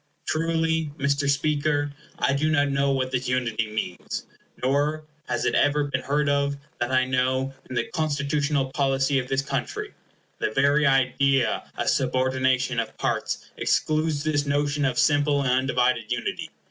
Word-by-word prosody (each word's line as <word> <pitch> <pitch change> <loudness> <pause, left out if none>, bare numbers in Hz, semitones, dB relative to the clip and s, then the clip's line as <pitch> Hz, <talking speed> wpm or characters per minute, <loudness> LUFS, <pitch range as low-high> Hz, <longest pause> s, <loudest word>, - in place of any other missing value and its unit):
Truly, 160 -1 0
Mr. 140 0 +1
Speaker, 145 0 +1 0.3
I 140 - +1
do 150 +3 +1
not 145 -2 +2
know 140 0 +1
what 130 -1 -1
this 130 -1 -1
unity 115 -3 -1
means, 100 -4 -4 0.4
nor 145 +4 +1 0.2
has 120 - -1
it - - +1
ever 145 +1 +3
been 145 - -2
heard 145 +1 0
of, 140 0 +1 0.2
that 120 - -1
I 130 0 +3
know, 130 +1 0 0.2
in 130 - -5
the 120 - +1
constitutional 145 -3 0
policy 135 0 +1
of 125 - -4
this 135 +1 0
country. - - -4 0.5
The - - 0
very 140 +5 +3
idea 135 -1 +2
of - - -2
subordination 130 -1 +1
of 115 -1 -4
parts - - -2
excludes 155 -1 +1
this 145 -2 0
notion 145 0 +1
of 130 - 0
simple 145 -1 +3
and 130 - +1
undivided 125 -3 +1
unity. 120 -1 -3
140 Hz, 155 wpm, -25 LUFS, 130-145 Hz, 0.5 s, ever